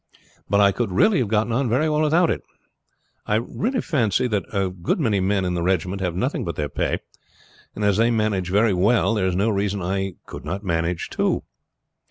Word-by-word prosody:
But 100 - +3
I 100 -1 +5
could 110 0 -2
really 190 - +3
have 125 - 0
got 110 +2 +1
on 125 +2 0
very 130 +8 +2
well 150 0 +1
without 160 +3 +3
it. - - -2 0.9
I 105 +1 +2 0.4
fancy 120 - +1
that 105 -5 -2
a 95 -3 0
good 90 - -2
many 110 -9 +1
men 95 0 +1
in 90 - -1
the 85 - -1
regiment 90 +2 0
have 90 -3 -1
nothing 125 +10 -1
but 85 -3 -4
their 75 -1 -2
pay, - - -1 0.7
and 105 - -2
as 100 -1 +3
they 115 +1 +3
manage 105 -5 0
very 105 +2 +3
well 110 +5 +3
there 100 -4 +1
is 90 - -1
no 105 +4 +2
reason 100 0 -1
I 95 0 -2
could - - -9
not 100 +3 -4
manage 85 -1 -2
too. - - 0
100 Hz, 205 wpm, -23 LUFS, 95-115 Hz, 0.9 s, I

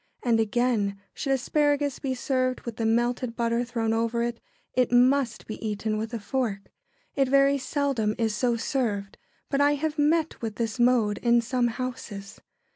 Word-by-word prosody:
And 235 -2 +3
again, 220 -3 +1
should 275 - -3
asparagus 290 +1 +1
be 260 -2 -2
served 255 0 0
with 235 -2 -7
the 225 - 0
melted 240 +1 0
butter 235 0 0
thrown 230 -2 -1
over 230 +1 0
it, 235 0 -3 0.3
it 250 -2 +2
must 250 -1 +3
be 215 - -7
eaten 215 0 -2
with 220 +1 -3
a 230 - -3
fork. 210 -3 -3 0.4
It 275 -2 +2
very 275 +1 +4
seldom 265 -7 0
is 225 -2 0
so 240 +1 +1
served, 215 -6 -2 0.3
but 280 0 +2
I 290 0 +4
have 305 +1 -2
met 315 +2 +1
with 225 -2 -4
this 230 0 -3
mode 240 -4 +3
in 235 0 +4
some 240 +1 0
houses. 230 -5 -6
240 Hz, 170 wpm, -26 LUFS, 225-265 Hz, 0.4 s, very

